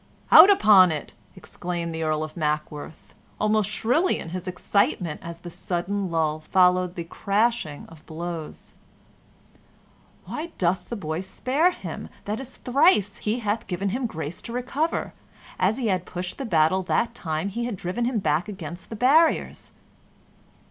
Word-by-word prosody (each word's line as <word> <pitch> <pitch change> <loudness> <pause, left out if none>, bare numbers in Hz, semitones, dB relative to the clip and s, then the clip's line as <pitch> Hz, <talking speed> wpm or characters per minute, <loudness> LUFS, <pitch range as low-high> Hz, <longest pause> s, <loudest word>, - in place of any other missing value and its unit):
"Out 390 - +11
upon 205 - +7
it!" 155 - -5 0.2
exclaimed 175 -2 -5
the 160 - -4
Earl 155 -1 0
of 155 - -7
Mackworth, 150 -1 -4 0.3
almost 215 -1 +2
shrilly 305 +11 +1
in - - -7
his 185 +2 -6
excitement, 180 -2 0
as 170 0 -7
the 175 0 -10
sudden 190 +3 -2
lull 155 -2 0
followed 180 +2 +2
the 170 - -4
crashing 200 -3 -1
of 160 -2 -15
blows. 165 -1 -7 1.5
"Why 330 +2 -6
doth 180 0 0
the 235 - -3
boy 160 -4 -3
spare 260 - +1
him? 360 - -7 0.2
That 210 +3 -3
is 265 -1 -8
thrice 250 - +3
he 220 +3 -2
hath 210 +1 -2
given 190 +2 -2
him 245 +4 -1
grace 160 -4 -6
to 235 - -8
recover; 270 +6 -2 0.5
an 185 +4 +2
he 255 - -3
had 185 -2 -1
pushed 180 +5 -5
the 270 - -3
battle 170 -2 +3
that 230 +5 0
time 160 -2 -3
he 235 +4 -3
had 240 -3 -3
driven 185 +6 -3
him 245 -1 0
back 175 -2 0
against 175 -3 -8
the 225 - -6
barriers." 290 +8 +2
185 Hz, 155 wpm, -25 LUFS, 170-230 Hz, 1.5 s, Out